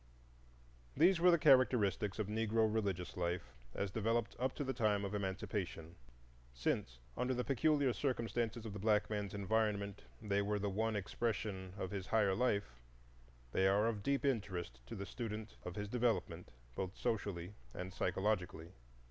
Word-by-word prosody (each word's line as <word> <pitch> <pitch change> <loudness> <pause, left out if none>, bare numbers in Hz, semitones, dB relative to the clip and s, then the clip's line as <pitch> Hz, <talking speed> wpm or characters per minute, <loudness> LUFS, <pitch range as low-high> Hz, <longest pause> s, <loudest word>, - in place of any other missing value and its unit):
These 170 +4 +6
were 180 +2 +6
the 170 - +6
characteristics 120 - +4
of 110 - 0
Negro 110 +1 +2
religious 95 -5 -1
life 85 -7 -2 0.2
as 100 -2 -1
developed 115 +2 0
up 130 +1 0
to - - -2
the 130 -1 -1
time 105 -4 +1
of 100 - -4
Emancipation. 95 -4 -3 0.6
Since - - -1 0.2
under 130 +1 0
the 125 - 0
peculiar 140 -1 +3
circumstances 120 -4 -1
of 110 - -5
the 105 - -5
black 105 0 +2
man's 105 -2 -2
environment 100 -1 0 0.2
they 100 -2 +1
were 105 +1 0
the 100 0 -1
one 110 +2 0
expression 100 -2 -2
of 95 -3 -3
his 95 -2 -4
higher 105 -4 +3
life, 100 - 0 0.7
they 95 +7 +3
are 100 +3 +4
of 110 -3 -1
deep 140 +6 0
interest 95 - -1
to - - -6
the 100 - -4
student 110 0 -5
of 90 - -6
his 105 0 -3
development, 110 -7 0 0.2
both 95 +7 -4
socially 100 -4 -2 0.2
and 90 +1 -5
psychologically. 90 -6 -1
105 Hz, 155 wpm, -37 LUFS, 95-115 Hz, 0.7 s, These